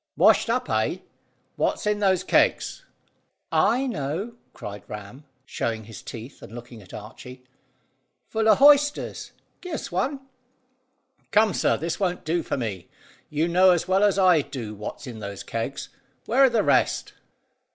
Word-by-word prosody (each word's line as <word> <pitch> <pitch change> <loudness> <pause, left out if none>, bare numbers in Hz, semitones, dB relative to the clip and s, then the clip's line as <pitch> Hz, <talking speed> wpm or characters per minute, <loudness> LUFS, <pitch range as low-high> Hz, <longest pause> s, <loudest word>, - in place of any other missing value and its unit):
"Washed - - +5
up, - - 0
eh? - - 0 0.6
What's - - 0
in 210 0 +1
those 190 -3 +2
kegs?" - - +1 0.7
"I 255 +3 +3
know," 180 - -3 0.2
cried 100 -1 -8
Ram, 105 +7 -9 0.2
showing 115 -4 -3
his 110 +1 -10
teeth, 120 +4 -9
and 115 - -11
looking 120 -1 -10
at 95 - -16
Archy. 125 +4 -10 0.8
"Full 220 0 +1
o' 215 - +7
hoysters! 290 +2 +4 0.3
Give 360 -3 -5
us - - -6
one!" 270 +10 -1 1.1
"Come, 215 -2 +4
sir; - - +2
this 165 +2 -3
won't 180 -3 -1
do 170 +2 0
for - - -3
me. 105 -8 -5 0.4
You 155 +2 0
know 180 +2 +5
as 175 -3 +2
well 190 +2 +3
as 205 -1 +3
I 180 -5 +5
do 130 -7 -7
what's 105 +7 -7
in 120 -4 -8
those 100 -2 -7
kegs. 115 0 -4 0.4
Where 265 +4 +5
are - - +5
the 230 -3 +1
rest?" - - +1
165 Hz, 155 wpm, -25 LUFS, -, 1.1 s, o